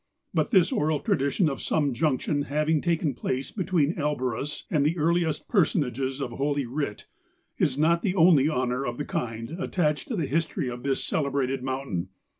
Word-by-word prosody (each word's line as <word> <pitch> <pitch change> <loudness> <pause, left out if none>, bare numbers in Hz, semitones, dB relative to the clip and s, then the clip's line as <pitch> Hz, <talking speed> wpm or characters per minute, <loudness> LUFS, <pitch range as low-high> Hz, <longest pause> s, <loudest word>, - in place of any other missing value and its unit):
But - - +1
this 190 -7 +4
oral 150 0 +1
tradition 140 +8 +1
of 135 -3 -3
some 145 -4 +1
junction 145 +1 0
having 150 +1 +1
taken 165 -4 0
place 130 +2 -3
between 175 -5 +1
Elborus 145 -3 -2
and 150 -4 +3
the 155 +4 +1
earliest 165 -1 +1
person¬ 170 - +2
ages 130 +2 -3
of 135 -3 -3
Holy 140 +2 -1
Writ, 125 -3 -4 0.5
is 135 -2 +1
not 165 +3 +3
the 190 -1 0
only 160 -5 +5
honour 125 -2 0
of 120 -2 -3
the - - -3
kind 115 0 -4
attached 155 -5 0
to 240 - -2
the 170 -6 0
history 155 -2 -1
of 120 0 -7
this 135 0 0
celebrated 135 -3 0
mountain. 130 -9 -3
145 Hz, 175 wpm, -26 LUFS, 130-160 Hz, 0.5 s, only